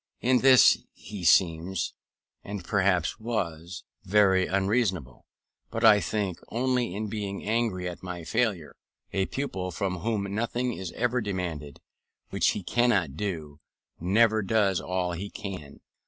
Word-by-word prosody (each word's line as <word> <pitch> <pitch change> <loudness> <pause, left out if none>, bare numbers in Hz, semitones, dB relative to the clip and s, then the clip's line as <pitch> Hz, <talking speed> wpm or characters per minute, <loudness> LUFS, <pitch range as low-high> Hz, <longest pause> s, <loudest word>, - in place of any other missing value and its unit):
In 125 +1 +3
this 130 -1 +7
he 100 -4 -9
seems, 85 +1 +2 0.5
and 100 -2 -6
perhaps 95 -2 +1
was, 90 -7 -4 0.2
very 95 -2 +3
unreasonable; 95 - -1 0.4
but 115 - -4
I 105 -2 +8
think, 100 -5 -2
only 125 -4 0
in 110 +2 -3
being 100 -2 -4
angry 110 -5 -1
at 90 - -7
my 90 -2 -6
failure. 105 -6 -1 0.4
A 95 -1 0
pupil 95 -10 -3
from 95 0 -2
whom 100 0 -2
nothing 120 +3 -1
is 95 -4 -6
ever 125 +1 0
demanded 90 -8 -4 0.5
which - - +1
he - - -5
cannot 105 - +1
do, 80 -7 -5 0.4
never 110 +5 +3
does 100 -3 +1
all 90 -1 -2
he 95 +4 -5
can. 95 -10 -8
100 Hz, 135 wpm, -27 LUFS, 90-110 Hz, 0.5 s, I